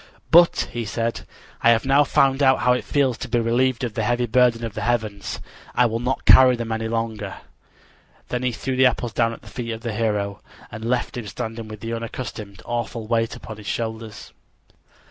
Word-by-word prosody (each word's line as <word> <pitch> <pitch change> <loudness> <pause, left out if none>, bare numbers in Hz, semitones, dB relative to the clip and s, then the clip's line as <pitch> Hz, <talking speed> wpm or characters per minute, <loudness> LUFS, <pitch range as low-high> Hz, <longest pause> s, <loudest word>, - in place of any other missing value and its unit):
"But," 170 +1 +6
he 120 - -3
said, 115 +2 -3 0.3
"I 115 - +5
have 115 0 +3
now 140 +2 +5
found 135 0 +2
out 130 -1 +4
how 125 - +4
it 125 - -1
feels 135 -4 +1
to - - -5
be 120 - +2
relieved 120 +2 +1
of 120 -3 -2
the 115 - -2
heavy 120 +3 +1
burden 120 0 +3
of 110 - -6
the - - -5
heavens. 110 -4 -2 0.4
I 125 - +5
will 115 -1 0
not 125 +2 -2
carry 130 -1 +8
them 115 -1 -5
any 110 0 -2
longer." 110 -3 -3 0.9
Then 125 - -2
he 125 -1 0
threw 130 +3 -3
the 130 0 +6
apples 120 -2 -2
down 115 -1 +2
at 115 - -10
the - - -15
feet 115 -2 -5
of 110 - -7
the 115 -1 -3
hero, 105 -3 -1 0.3
and 110 - -7
left 120 +1 -1
him 115 -3 -5
standing 115 +1 -5
with 110 -1 -9
the 115 +2 -4
unaccustomed, 110 -3 -6
awful 120 -1 -3
weight 115 0 0
upon 110 -2 -9
his 105 -1 -11
shoulders. 110 -1 -5
115 Hz, 205 wpm, -23 LUFS, 110-125 Hz, 0.9 s, carry